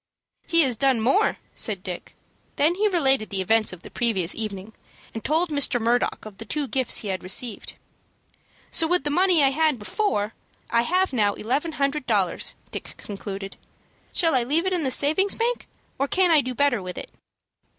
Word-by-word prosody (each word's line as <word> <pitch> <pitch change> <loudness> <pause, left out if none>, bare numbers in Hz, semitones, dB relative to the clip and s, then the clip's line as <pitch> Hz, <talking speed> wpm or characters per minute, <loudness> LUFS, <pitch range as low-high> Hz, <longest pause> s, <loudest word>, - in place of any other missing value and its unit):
"He 335 -1 +5
has 255 -6 +2
done 265 -1 +2
more," 270 - +2 0.2
said 200 -4 -2
Dick. 180 -2 -7 0.4
Then 305 +4 +3
he 415 +4 +1
related 270 - +2
the 195 - -2
events 215 +3 +2
of 180 -1 -11
the - - -10
evening 200 -1 -1
previous, - - -28
and 225 - -6
told 320 +3 +1
Mr. 285 -4 +3
Murdock 235 +1 0
of 210 -2 -11
the - - -5
two 290 +6 -3
gifts 260 -1 +2
he 210 - -3
had 185 -1 -2
received. 200 +4 -3 1.0
"So, 325 - +4
with 360 +2 +1
the 295 - -1
money 355 -1 +3
I 270 - +5
had 310 -1 +2
before, 215 - -1 0.4
I 235 - +4
have 365 +6 +1
now 205 -4 +2
eleven 285 +9 -2
hundred 280 -1 -1
dollars," 200 -6 +1 0.2
Dick - - -7
concluded. 195 -1 -7 0.5
"Shall 330 -3 +3
I 255 - +4
leave 300 +9 0
it 375 - 0
in 350 -3 0
the - - +1
savings 315 +10 +1
bank, 475 +1 -1 0.3
or 275 - +1
can 365 +3 +3
I 310 -3 +6
do 255 -1 -5
better 280 -6 +2
with 180 -1 -7
it?" - - -7
260 Hz, 190 wpm, -24 LUFS, 215-320 Hz, 1.0 s, I